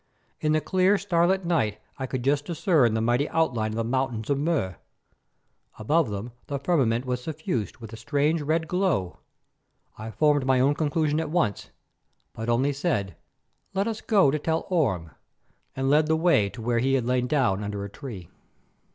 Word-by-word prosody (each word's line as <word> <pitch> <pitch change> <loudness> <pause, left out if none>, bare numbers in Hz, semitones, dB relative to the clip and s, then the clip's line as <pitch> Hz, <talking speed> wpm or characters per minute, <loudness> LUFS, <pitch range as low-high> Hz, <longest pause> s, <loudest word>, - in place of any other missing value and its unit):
In 155 0 +1
the 155 - +2
clear, 190 +3 +3
starlight 190 -1 +1
night 110 -12 +1 0.2
I 130 - -3
could 130 -1 -4
just 140 +2 +1
discern 155 - +2
the 110 - 0
mighty 120 +5 +1
outline 120 -10 0
of - - -5
the 115 - 0
mountains 120 -1 -1
of 140 - +1
Mur. 140 - -1 1.0
Above 150 +6 +1
them 105 +4 -5 0.2
the 140 - -2
firmament 135 -6 +1
was 125 -1 -2
suffused 155 - -3
with 115 -1 -10
a - - -7
strange 145 +4 0
red 160 +2 0
glow. 175 - 0 0.8
I 110 +1 -6
formed 145 +6 +2
my 130 -1 +4
own 135 +3 +4
conclusion 155 0 0
at 160 - -2
once, 150 - -1 0.6
but 115 +1 -5
only 130 +5 +2
said: 135 - -1 0.6
"Let 195 +3 +1
us 220 -2 -3
go 195 -11 +4
to 155 - -1
tell 160 +2 -1
Orme," 95 - 0 0.6
and 135 0 -1
led 150 +2 +4
the 160 0 +2
way 160 - +3
to 115 +2 -9
where 120 0 +1
he 135 +3 +2
had 125 -3 0
lain 125 0 +1
down 125 -9 +1
under 100 -1 -4
a - - -5
tree. 105 - -8
135 Hz, 180 wpm, -26 LUFS, 115-160 Hz, 1.0 s, my